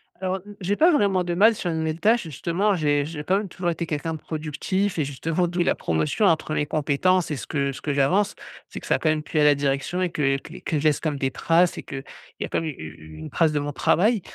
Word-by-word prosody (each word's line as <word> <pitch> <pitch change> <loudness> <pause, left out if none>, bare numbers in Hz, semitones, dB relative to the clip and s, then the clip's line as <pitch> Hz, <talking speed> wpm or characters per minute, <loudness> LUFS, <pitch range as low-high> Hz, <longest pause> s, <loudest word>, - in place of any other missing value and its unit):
Alors, 185 +1 -2
mmh, 205 - -10
j'ai 195 +3 0
pas 330 +10 +5
vraiment 200 - +2
de 175 0 -2
mal 215 +6 +5
sur 180 - -3
une 160 - -2
nouvelle 160 +1 -2
tâche. 230 +3 +3
Justement, 175 +6 0
j'ai 145 -3 +1
j'ai 150 -1 -6
quand 190 +6 +2
même 210 - -3
toujours 180 -1 -3
été 170 0 -2
quelqu'un 160 +1 -3
de 160 - -6
productif, 160 +5 -2
et 150 - +1
justement, 165 +6 -1
d'où 175 +1 -1
la - - +2
promotion 80 - 0
entre 160 -3 +2
mes 150 - 0
compétences, 155 +4 +1
et - - 0
ce - - -7
que 140 -2 -1
ce - - -9
que 145 - -1
j'avance. 185 +9 +2 0.3
C'est - - -8
que - - -11
ça - - +3
a - - -2
quand 155 - +1
même 155 -1 0
plu 155 - -2
à 150 - +5
la 150 -1 +6
direction 140 +6 -1
et 180 - +1
que 135 -3 +1
que - - -11
que 155 - -2
je - - -4
laisse 155 -2 +3
quand 155 - -1
même 145 - -5
des 135 -1 0
traces, 165 +6 +2
et - - -6
qu'il 135 -1 -7 0.4
y - - 0
a - - -9
quand - - 0
même 160 - -3
u - - -5
u 80 0 -10
une 80 - -7
trace 165 -2 +2
de 150 - +1
mon 145 0 -3
travail. 210 - +2
160 Hz, 285 wpm, -24 LUFS, 145-185 Hz, 0.4 s, la